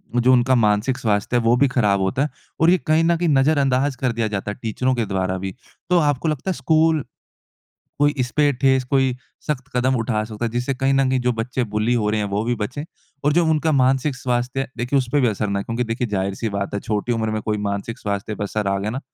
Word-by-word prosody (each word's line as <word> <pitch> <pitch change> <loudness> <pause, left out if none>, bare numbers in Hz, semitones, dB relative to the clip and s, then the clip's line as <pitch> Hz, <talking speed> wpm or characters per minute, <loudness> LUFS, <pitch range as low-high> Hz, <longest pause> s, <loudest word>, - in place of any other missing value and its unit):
जो 125 +1 +4
उनका 125 +1 +4
मानसिक 110 +3 +2
स्वास्थ्य 105 +2 0
है - - +2
वो 115 +1 +4
भी 140 +2 +4
खराब 105 -6 +2
होता 95 +7 0
है। 150 - -1 0.3
और 165 - +5
ये 185 - +5
कहीं 155 +1 +4
न 170 0 +3
कहीं 170 -1 0
नज़रअंदाज 140 -1 +2
कर 125 -1 0
दिया 115 -1 -1
जाता 105 -1 -3
है - - -8
टीचरों 125 +3 0
के 115 -3 0
द्वारा 95 -1 -1
भी। 95 0 -5 0.4
तो 180 -1 +4
आपको 145 0 +1
लगता 155 +5 -3
है - - 0
स्कूल, 160 -2 +2 1.0
कोई 145 0 +3
इसपे 145 +4 +2
ठोस 130 0 +2
कोई 135 -2 +2 0.3
शख्त 145 -4 -1
कदम 130 +2 +2
उठा 110 -2 -1
सकता 110 +1 -4
है। 115 - -2
जिससे 125 +3 -1
कहीं 135 +1 +1
न 135 -1 +3
कहीं 130 0 +1
जो 125 0 +1
बच्चे 125 +3 -2
बुली 110 +3 +2
हो 105 -3 +1
रहे 110 - 0
हैं, 105 - -1
वो 105 +2 -1
भी 120 0 0
बचे। 125 +8 -4 0.4
और 145 - +3
जो 170 +1 +3
उनका 160 0 +2
मानसिक 135 0 +2
स्वास्थ्य 125 0 -2
है, - - -4
देखिए 125 +4 0
उसपे 130 +3 0
भी 125 - +3
असर 105 0 -2
न 100 - -1
आए। 100 - -2
क्योंकि 115 +3 -2
देखिए 120 +1 -2
जाहिर-सी 100 +2 -2
बात 100 0 -3
है 100 - -1
छोटी 105 +3 -2
उम्र 110 -1 -1
में 110 - -2
कोई 105 -1 -1
मानसिक 100 +4 -4
स्वास्थ्य 100 +1 -3
पे 105 - -4
असर 105 0 -2
आ 100 - +1
गया 105 - -2
ना, 130 - -3
125 Hz, 250 wpm, -21 LUFS, 105-135 Hz, 1.0 s, और